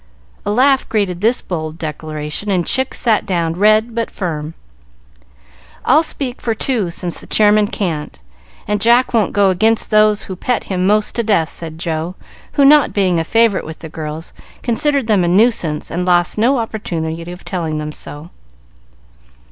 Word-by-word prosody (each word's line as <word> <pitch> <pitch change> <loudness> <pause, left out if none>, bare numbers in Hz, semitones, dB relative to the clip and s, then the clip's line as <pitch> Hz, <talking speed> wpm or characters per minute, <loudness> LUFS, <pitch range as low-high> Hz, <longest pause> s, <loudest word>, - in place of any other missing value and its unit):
A - - +1
laugh 265 +4 +3
greeted 195 -5 -1
this 230 +4 +1
bold 160 -3 -5
declaration, 155 +3 -4
and 180 -3 +1
Chick 260 0 0
sat 225 -3 +1
down, 170 -3 -1
red 215 +5 +3
but 230 0 -2
firm. 160 -4 -5 1.3
"I'll 300 +5 +5
speak 270 -5 -4
for 225 -2 -1
two 220 -6 -1
since 175 0 -4
the - - -13
Chairman 210 0 +4
can't, 165 - -4 0.5
and 210 0 -1
Jack 240 +3 +4
won't 220 -4 +2
go 200 -2 +3
against 220 +4 +1
those 215 -1 +4
who 190 - -7
pet 245 +6 -1
him 185 -1 -1
most 210 +1 +2
to 235 - +1
death," 200 -8 +1
said 160 -1 -6
Joe, 165 +1 -3 0.4
who, 280 - +4
not 295 0 +5
being 185 -4 +2
a - - 0
favorite 225 +3 +2
with 160 0 -8
the 160 - -9
girls, 155 +1 -6 0.3
considered 280 +2 +1
them 210 -5 +2
a - - +1
nuisance 180 -5 +1
and 175 +2 -2
lost 175 -1 +2
no 245 +6 +2
opportunity 170 -7 -4
of 180 - -11
telling 165 -4 -3
them 150 0 -4
so. 150 +2 -10
195 Hz, 170 wpm, -17 LUFS, 165-225 Hz, 1.3 s, I'll